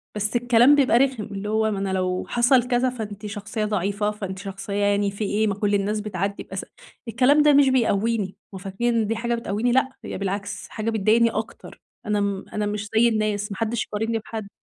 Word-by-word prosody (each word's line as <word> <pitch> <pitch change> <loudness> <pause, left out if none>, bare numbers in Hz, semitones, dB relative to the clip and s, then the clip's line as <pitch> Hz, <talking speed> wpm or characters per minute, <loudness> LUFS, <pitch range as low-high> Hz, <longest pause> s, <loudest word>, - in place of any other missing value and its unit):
بس 210 +2 -2
الكلام 245 +3 +5
بيبقى 265 -5 +4
رخم، 260 -4 +1
اللي 200 +1 -6
هو 220 0 +1
ما 195 - -2
أنا 195 -1 -2
لو 185 -1 -1
حصل 245 +1 +3
كذا 250 +1 +2
فأنتِ 215 -4 -7
شخصية 210 +1 -4
ضعيفة، 205 +1 -1
فأنتِ 195 -3 -6
شخصية 195 0 -6
يعني 205 0 +1
في 200 +2 -5
إيه 210 +2 +1
ما 200 - -1
كل 205 0 +1
الناس 205 +2 0
بتعدِّي 200 -1 -3
بأز - - -6 0.4
الكلام 255 +6 +4
ده 295 -1 +5
مش 280 -1 +6
بيقويني 225 -5 +1 0.2
هُم - - -6
فاكرين 210 +5 -1
إن 220 -2 +1
دي 225 - -1
حاجة 235 +1 -1
بتقويني 230 +1 -1
لأ 260 +1 +3 0.2
هي - - -5
بالعكس 200 +1 -4
حاجة 215 0 -3
بتضايقني 225 +2 +3
أكتر، 220 +1 -6 0.2
أنا 210 -1 0
م 200 -1 -2
أنا 210 -1 -1
مش 205 0 -3
زي 235 +2 +5
الناس 215 -2 -1
ما 195 - -5
حدش 225 0 -1
يقارنني 225 +2 -2
بحد. 220 -1 -7
215 Hz, 205 wpm, -23 LUFS, 200-235 Hz, 0.4 s, مش